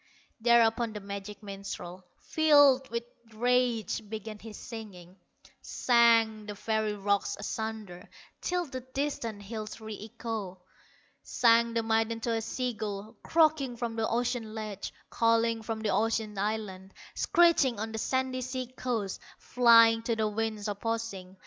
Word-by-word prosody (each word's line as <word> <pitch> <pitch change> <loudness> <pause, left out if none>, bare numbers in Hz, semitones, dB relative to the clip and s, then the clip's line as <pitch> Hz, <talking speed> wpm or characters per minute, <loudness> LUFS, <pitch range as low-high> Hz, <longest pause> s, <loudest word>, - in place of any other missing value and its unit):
Thereupon 230 -1 +3
the 210 - -5
magic 200 +1 -7
minstrel, 195 -2 -7 0.2
Filled 290 -4 +5
with 235 0 -2 0.3
rage, 245 -3 +1
began 220 0 -6
his 215 -1 -10
singing; 190 -6 -9 0.5
Sang 230 -3 +3
the 205 - -5
very 220 0 -1
rocks 200 0 0
asunder, 215 -4 -5 0.3
Till 360 0 -1
the 260 -3 -6
distant 255 -5 -4
hills 215 +1 -6
re 220 -1 -7 0.2
echoed; 210 -5 -5 0.6
Sang 235 -1 +3
the 230 - +1
maiden 225 0 +1
to 230 0 -1
a 225 - 0
sea 250 +2 -2
gull, 210 -1 -6
Croaking 310 -6 +2
from 230 -1 -3
the 225 -1 -1
ocean 235 -2 -1
ledges, 215 -3 -5 0.2
Calling 230 0 +2
from 220 0 -4
the 215 - -1
ocean 220 -1 0
islands, 195 -2 -4 0.2
Screeching 325 -9 +3
on 220 +1 -3
the 220 - -4
sandy 260 +1 -1
sea 255 0 -3
coast, 225 -8 -3 0.2
Flying 230 -2 +5
to 230 0 -1
the 220 -1 0
winds 215 0 -2
opposing. 205 -3 -4
225 Hz, 135 wpm, -29 LUFS, 210-235 Hz, 0.6 s, Filled